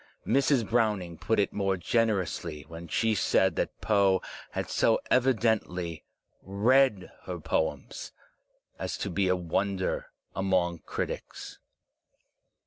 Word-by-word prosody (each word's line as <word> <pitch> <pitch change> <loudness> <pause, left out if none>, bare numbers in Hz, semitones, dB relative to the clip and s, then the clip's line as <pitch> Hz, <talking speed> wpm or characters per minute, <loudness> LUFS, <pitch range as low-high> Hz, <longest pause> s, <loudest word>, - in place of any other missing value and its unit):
Mrs. 135 -4 +2
Browning 105 -8 0
put 110 - +1
it 100 - +1
more 95 -2 0
generously 90 -6 0
when 85 +1 -9
she 110 +7 +1
said 95 -2 +2
that - - -2
Poe 100 -3 +3 0.3
had - - -2
so - - +2
evidently 110 -9 +1 0.4
read 105 +1 +2
her 90 -1 -5
poems 80 0 -2 0.7
as - - -3
to 100 - -3
be 95 +2 +1
a 90 - +3
wonder 95 +2 -1 0.3
among 90 -3 +1
critics. - - -5
95 Hz, 115 wpm, -28 LUFS, 90-110 Hz, 0.7 s, Poe